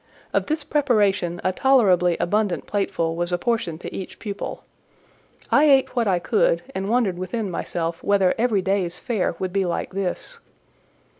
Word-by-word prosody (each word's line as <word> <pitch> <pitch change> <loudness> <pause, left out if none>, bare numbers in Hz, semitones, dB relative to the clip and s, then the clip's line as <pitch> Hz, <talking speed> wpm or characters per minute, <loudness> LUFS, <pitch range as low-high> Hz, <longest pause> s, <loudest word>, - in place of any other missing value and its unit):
Of - - +1
this 310 -1 -1
preparation 205 - +1
a 185 - +2
tolerably 185 -8 +3
abundant 205 -1 0
plateful 170 -5 -1
was 175 +1 -2
apportioned 175 -3 -1
to - - -7
each 190 - -7
pupil. 205 -2 -6 0.9
I 290 - +5
ate 270 -3 +4
what 235 -3 +1
I 185 -2 +3
could, - - +1
and 195 +1 -3
wondered 220 -7 +1
within 190 +2 -3
myself 170 -1 -3
whether 195 -2 +3
every 220 -5 +1
day's 185 -3 0
fare 215 -8 -1
would 185 0 -4
be 195 -1 +2
like 175 0 -2
this. 195 - -4
195 Hz, 155 wpm, -23 LUFS, 180-235 Hz, 0.9 s, I